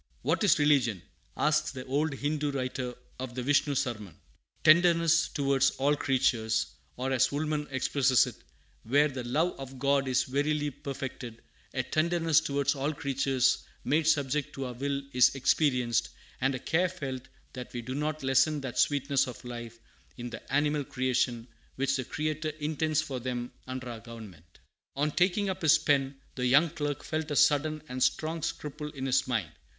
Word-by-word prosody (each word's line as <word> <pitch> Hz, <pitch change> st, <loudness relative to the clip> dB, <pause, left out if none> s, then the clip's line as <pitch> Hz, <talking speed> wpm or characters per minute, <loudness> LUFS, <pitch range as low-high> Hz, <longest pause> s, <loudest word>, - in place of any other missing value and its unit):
"What -, -, +1 dB
is 205 Hz, -, +5 dB
religion?" 135 Hz, -, +2 dB, 0.3 s
asks 150 Hz, 0 st, +2 dB
the 130 Hz, -2 st, -7 dB
old 145 Hz, +2 st, 0 dB
Hindoo 145 Hz, +2 st, -1 dB
writer 130 Hz, -2 st, -3 dB, 0.2 s
of 125 Hz, -2 st, -6 dB
the 125 Hz, -, -3 dB
Vishnu 145 Hz, +1 st, +2 dB
Sarman. 110 Hz, -, -3 dB, 0.4 s
"Tenderness 170 Hz, +1 st, +5 dB
toward 140 Hz, -2 st, +1 dB
all 140 Hz, +3 st, +2 dB
creatures." 115 Hz, -6 st, +1 dB, 0.3 s
Or, 130 Hz, +2 st, -2 dB
as 130 Hz, 0 st, +3 dB
Woolman 150 Hz, 0 st, -1 dB
expresses 130 Hz, -1 st, +3 dB
it, -, -, -7 dB, 0.5 s
"Where 145 Hz, +6 st, +3 dB
the 130 Hz, -2 st, -5 dB
love 150 Hz, +9 st, 0 dB
of 135 Hz, 0 st, -8 dB
God 140 Hz, +1 st, +2 dB
is 130 Hz, -1 st, +2 dB
verily 145 Hz, +2 st, 0 dB
perfected, 130 Hz, -4 st, -7 dB, 0.3 s
a -, -, +1 dB
tenderness 165 Hz, 0 st, +2 dB
towards 140 Hz, -2 st, 0 dB
all 145 Hz, +2 st, -2 dB
creatures 135 Hz, -3 st, +1 dB, 0.2 s
made 155 Hz, +2 st, +1 dB
subject 145 Hz, -2 st, +1 dB
to 135 Hz, -, -4 dB
our 125 Hz, -, -5 dB
will 140 Hz, +2 st, -2 dB
is 125 Hz, +2 st, +5 dB
experienced, 125 Hz, -3 st, +2 dB, 0.3 s
and 135 Hz, +1 st, +1 dB
a -, -, -4 dB
care 175 Hz, +7 st, +1 dB
felt 135 Hz, -8 st, -6 dB, 0.3 s
that 125 Hz, -1 st, -7 dB
we 120 Hz, -1 st, -5 dB
do 130 Hz, -, -5 dB
not 150 Hz, +1 st, -2 dB
lessen 135 Hz, +3 st, +3 dB
that 130 Hz, -3 st, -4 dB
sweetness 140 Hz, -1 st, +2 dB
of 125 Hz, 0 st, -9 dB
life 120 Hz, -1 st, -7 dB, 0.4 s
in 120 Hz, 0 st, -6 dB
the -, -, -10 dB
animal 145 Hz, +1 st, +1 dB
creation 125 Hz, -2 st, -1 dB, 0.3 s
which 135 Hz, 0 st, 0 dB
the 130 Hz, -2 st, -2 dB
Creator 155 Hz, +2 st, -2 dB
intends 155 Hz, 0 st, 0 dB
for 135 Hz, -5 st, -5 dB
them 125 Hz, 0 st, -4 dB
under 130 Hz, 0 st, -5 dB
our 120 Hz, -2 st, -6 dB
government."] 105 Hz, -8 st, -12 dB, 0.3 s
On 150 Hz, +2 st, 0 dB
taking 185 Hz, +5 st, +2 dB
up 190 Hz, 0 st, -3 dB
his 160 Hz, -1 st, +6 dB
pen, 140 Hz, -3 st, +1 dB
the 125 Hz, -1 st, -1 dB
young 145 Hz, +6 st, +5 dB
clerk 145 Hz, -3 st, -3 dB
felt 155 Hz, 0 st, -3 dB
a 145 Hz, -, -2 dB
sudden 155 Hz, +2 st, +3 dB
and 130 Hz, -1 st, -5 dB
strong 160 Hz, +4 st, +1 dB
scruple 150 Hz, 0 st, -4 dB
in 135 Hz, -2 st, -5 dB
his 135 Hz, 0 st, +2 dB
mind. 110 Hz, -11 st, -1 dB
140 Hz, 170 wpm, -29 LUFS, 125-150 Hz, 0.5 s, his